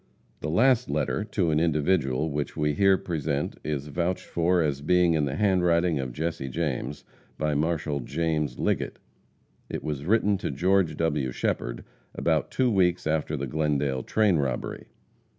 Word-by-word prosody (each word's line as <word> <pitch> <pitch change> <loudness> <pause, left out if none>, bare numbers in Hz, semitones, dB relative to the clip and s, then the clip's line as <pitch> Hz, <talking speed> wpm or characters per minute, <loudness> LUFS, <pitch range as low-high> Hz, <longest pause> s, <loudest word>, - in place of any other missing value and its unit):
The 75 - -4
last 125 +8 +3
letter, - - 0
to 95 -6 0
an 75 - +2
individual, 75 -2 +1
which 75 +1 -3
we 75 -1 +1
here 95 +5 +4
present, 75 -5 -2
is 75 -2 -2
vouched 85 +5 -2
for 85 +2 +1
as 70 -2 -1
being 90 +2 +3
in 75 -2 +2
the 70 -1 -3
handwriting 90 -4 +2
of 65 -2 -3
Jesse 80 0 -3
James, 70 -1 -3 0.3
by 75 -1 0
Marshal 75 -1 0
James 75 -1 -1
Liggett. - - -1 0.7
It - - -4
was 75 -2 -4
written 105 -2 +3
to - - -3
George 90 -4 +1
W. 75 -6 0
Shepherd - - -2 0.3
about - - +1
two 130 -2 +1
weeks 90 -3 +2
after 80 -1 0
the 70 - -3
Glendale 70 -2 0
train 105 - +2
robbery. 65 -4 -3
80 Hz, 155 wpm, -26 LUFS, 70-90 Hz, 0.7 s, here